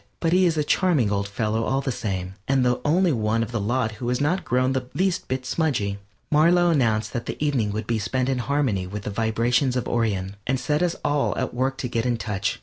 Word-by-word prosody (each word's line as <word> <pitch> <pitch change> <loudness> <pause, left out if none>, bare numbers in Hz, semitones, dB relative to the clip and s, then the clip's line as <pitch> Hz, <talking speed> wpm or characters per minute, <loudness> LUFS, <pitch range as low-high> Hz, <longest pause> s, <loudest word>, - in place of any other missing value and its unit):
But 165 0 +1
he 185 0 +5
is 165 -2 0
a 150 - +2
charming 145 - +2
old 100 0 0
fellow 110 +2 -1
all 135 +3 0
the 135 - -2
same, 95 -5 -3
and 135 -2 +2
the 125 0 +1
only 175 +4 +3
one 115 -2 +1
of 115 - -6
the 115 - -1
lot 115 +2 0
who 120 +2 -5
has 125 - 0
not 160 +7 +1
grown 130 +2 +1
the 130 -1 -2
least 185 0 0
bit 130 0 -3
smudgy. 120 -11 -1 0.3
Marlow 170 +3 +4
announced 115 -8 +1
that 120 -2 -4
the - - -4
evening 135 -8 0
would 110 +1 -3
be 115 0 0
spent 125 +4 -1
in 135 -2 0
harmony 125 -8 0
with 100 +2 -6
the 105 - -4
vibrations 115 +5 +1
of 125 - -1
Orion, 100 -4 -1
and 130 0 +1
set 150 +3 0
us 175 -1 +1
all 145 -1 +1
at 130 - -2
work 130 +2 -1
to 130 - -3
get 115 0 -1
in 120 -1 +1
touch. 105 0 -2
125 Hz, 240 wpm, -24 LUFS, 110-145 Hz, 0.3 s, he